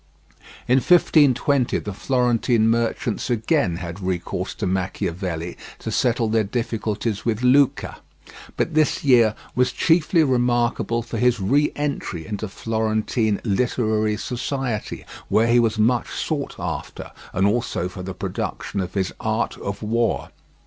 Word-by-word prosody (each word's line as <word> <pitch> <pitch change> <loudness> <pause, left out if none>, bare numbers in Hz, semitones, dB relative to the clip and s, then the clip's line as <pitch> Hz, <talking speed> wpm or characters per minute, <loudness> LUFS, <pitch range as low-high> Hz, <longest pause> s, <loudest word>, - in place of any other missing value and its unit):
In 125 - +4
1520 140 -5 +3
the 105 - -5
Florentine 120 -1 +2
merchants 115 0 -1
again 115 - +1
had 85 +1 -6
recourse 90 -2 -3
to - - -3
Machiavelli 90 -2 -2 0.2
to 110 - -5
settle 115 +1 +1
their 110 0 +2
difficulties 110 -1 -2
with 115 0 -1
Lucca, 135 +2 +3 0.6
but 165 - 0
this 155 -1 +2
year 120 -6 +5 0.2
was 125 0 +2
chiefly 165 +3 +3
remarkable 120 -3 +1
for 115 -1 -5
his 125 -1 +3
re 140 +10 +2
entry 140 - -3
into 105 0 -4
Florentine 110 +1 -1
literary 110 -1 0
society, 125 -2 -3 0.2
where 110 - +4
he 120 +1 +4
was 115 -2 +1
much 115 +3 +2
sought - - -3
after, - - -5 0.2
and 95 +1 +1
also 105 -4 0
for 90 0 -8
the 95 0 -6
production 100 - -4
of 90 0 -4
his 95 -2 -1
"Art - - -1
of - - -5
War." 115 0 0
115 Hz, 135 wpm, -22 LUFS, 105-125 Hz, 0.6 s, year